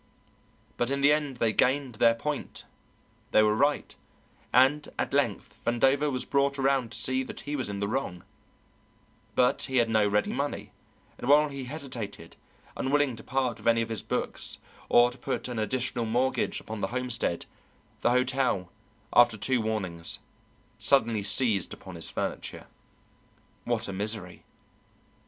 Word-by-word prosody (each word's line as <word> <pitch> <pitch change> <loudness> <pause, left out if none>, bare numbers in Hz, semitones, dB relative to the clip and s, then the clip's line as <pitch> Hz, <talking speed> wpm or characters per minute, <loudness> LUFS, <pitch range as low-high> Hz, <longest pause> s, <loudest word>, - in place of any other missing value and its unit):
But 120 - 0
in 140 0 -1
the 145 +1 +6
end 145 -4 -1
they 115 -2 +1
gained 130 +1 +2
their 115 -1 +6
point; 145 +4 -4 0.7
they 110 - +5
were 105 0 +4
right, 145 +5 +1 0.6
and 135 +4 +4
at - - -2
length - - -1
Vandover 135 +5 +2
was 130 -1 -3
brought 140 0 +1
around 135 -3 +1
to - - -4
see 130 0 +1
that 130 - -7
he 145 0 -4
was 130 -6 -2
in 100 -1 -4
the 100 - -1
wrong, 100 -7 -3 1.1
but 125 0 +3
he 130 -1 -2
had 115 -2 +3
no 110 -2 +4
ready 105 +1 +1
money, 140 +2 -3 0.5
and 125 - -4
while 150 +1 +6
he 140 -2 -6
hesitated, 125 - -6 0.4
unwilling 140 -1 +1
to 110 - -11
part 125 -3 -1
with - - -6
any 115 0 +4
of 115 - -7
his 110 -2 -2
bonds - - -3 0.3
or 120 0 +6
to 125 - -14
put 135 - -3
an 120 -2 -3
additional 120 +1 -1
mortgage 125 +4 0
upon 110 -1 -7
the - - 0
homestead, 125 -8 -2 0.6
the - - +3
hotel, 125 -7 +1 0.4
after 120 -2 +6
two 125 +4 +1
warnings, 95 -7 -3 0.6
suddenly 115 -6 +3
seized 105 -1 0
upon - - -11
his - - -5
furniture. - - -4 1.0
What - - -1
a 100 - -4
misery! 100 -2 -3
125 Hz, 155 wpm, -28 LUFS, 110-135 Hz, 1.1 s, the